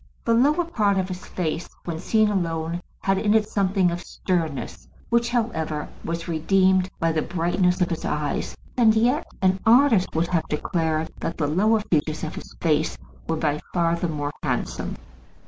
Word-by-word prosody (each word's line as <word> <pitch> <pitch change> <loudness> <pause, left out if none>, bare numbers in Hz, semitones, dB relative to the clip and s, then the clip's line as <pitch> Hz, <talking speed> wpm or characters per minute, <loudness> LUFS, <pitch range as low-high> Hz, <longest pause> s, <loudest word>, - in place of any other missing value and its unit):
The 230 - +3
lower 295 +9 +3
part 210 -11 +1
of 190 0 0
his 180 0 -7
face, 165 -1 -3 0.2
when 165 -2 -3
seen 215 +4 +2
alone, 170 -3 -1 0.2
had 195 0 +1
in 210 0 +2
it 215 -1 +3
somewhat 195 -3 +2
of 175 +1 -4
sternness, 165 -6 -3 0.2
which, 235 0 +2
however, 160 -11 -1
was 170 0 -4
redeemed 185 +3 +3
by 165 0 +2
the 160 -1 0
brightness 180 +2 +1
of 175 - +2
his 165 - -3
eyes. 150 -1 -2 0.2
And 225 -3 +5
yet 245 +7 +2 0.2
an 190 0 +3
artist 230 -6 +4
would 165 +2 +1
have 165 -3 0
declared 160 +1 -1
that 165 - -3
the 155 - 0
lower 210 +9 +3
features 155 -5 -1
of 155 - -3
his - - -9
face 155 -2 +1 0.3
were 165 - +1
by 150 -2 0 0.2
far 170 -1 +2
the 170 +1 -2
more 145 -2 -3
handsome. - - -2
180 Hz, 175 wpm, -24 LUFS, 160-210 Hz, 0.3 s, And